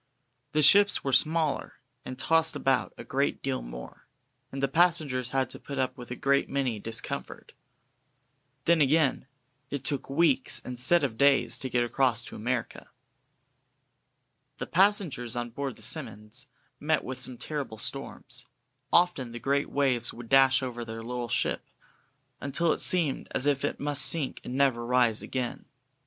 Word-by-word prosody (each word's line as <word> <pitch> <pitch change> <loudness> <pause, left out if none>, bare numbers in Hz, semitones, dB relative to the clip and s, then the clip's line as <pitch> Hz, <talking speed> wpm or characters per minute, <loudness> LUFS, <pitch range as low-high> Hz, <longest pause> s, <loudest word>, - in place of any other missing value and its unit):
The 155 0 +2
ships 200 +7 +5
were 140 - -1
much 130 - +8
smaller, 160 -2 -2 0.3
and 130 - -7
tossed 160 +3 +2
about 135 -1 +1
a - - -8
great 140 +2 -1
deal 135 -1 -2
more, - - -10 0.4
and 135 0 -5
the - - +4
passengers 150 -5 +1
had 135 0 0
to - - -9
put 140 - -7
up 130 -1 -1
with 125 -3 -10
a 125 - -4
great 140 +2 +1
many 130 -6 -1
discomforts. 115 +2 -4 1.1
Then 170 -1 +4
again, 145 -2 +2 0.4
it 140 -2 -4
took 135 +1 -2
weeks, 140 -2 +2
instead 125 +7 +1
of 115 -5 -2
days, 135 -4 +3
to 130 - -4
get 120 -1 +1
across 120 0 +1
to - - -10
America. 120 +2 -4 1.7
The - - -4
passengers 180 - +1
on 120 0 -4
board 135 0 -4
the - - -9
"Simmonds" 105 +6 -3 0.3
met 155 +1 +1
with 130 0 -6
some 125 - -2
terrible 135 -3 -5
storms; - - -3 0.4
often 170 -9 +2
the 120 - -6
great 140 +2 0
waves 130 -5 0
would 120 -1 -11
dash 135 0 +5
over 120 -2 -4
their 115 0 -7
little 120 0 -4
ship, - - 0 0.8
until 160 +4 +1
it - - -5
seemed 165 -7 0
as 130 - +2
if 140 -1 +1
it 145 - -2
must 145 -1 +1
sink 155 -5 +3
and 125 - -6
never 135 -4 +2
rise 120 -2 +2
again. 125 -2 -4
135 Hz, 160 wpm, -28 LUFS, 120-145 Hz, 1.7 s, much